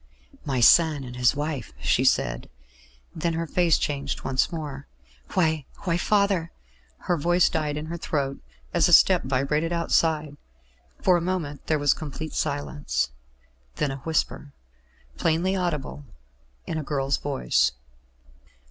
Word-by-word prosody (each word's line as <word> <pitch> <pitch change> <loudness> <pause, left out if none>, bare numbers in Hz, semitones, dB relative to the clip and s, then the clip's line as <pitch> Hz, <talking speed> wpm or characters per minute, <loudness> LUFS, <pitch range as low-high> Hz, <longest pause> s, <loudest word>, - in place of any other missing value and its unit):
"My 135 -4 -1
son 155 +3 +5
and 125 -1 -8
his 125 +2 +3
wife," 145 - -4
she - - +2
said; - - +1 0.7
then 165 +1 -1
her 165 +1 -2
face 170 0 +2
changed 140 -2 -3
once 130 -1 0
more. 145 -4 -6 0.5
"Why 160 -5 +1 0.2
why, 170 -3 0
father 200 -3 +1 0.2
" 65 - -34
Her 175 - +3
voice 175 +3 +3
died 150 -2 -2
in 150 - -4
her 170 +2 -5
throat, 140 -4 -2 0.3
as - - +3
a - - +3
step - - +7
vibrated 140 +5 0
outside. 160 -3 +1 0.7
For 180 -1 +5
a - - -2
moment 165 -5 -3
there 155 - +2
was 145 -1 +3
complete 155 +1 -7
silence; 145 - -2 0.6
then 140 - -1
a 135 - -5
whisper, 150 -1 -2 0.6
plainly 170 +4 +1
audible, 155 -6 -3 0.6
in 160 - -3
a - - -4
girl's 140 -1 -1
voice. 130 - +1
150 Hz, 140 wpm, -25 LUFS, 140-165 Hz, 0.7 s, step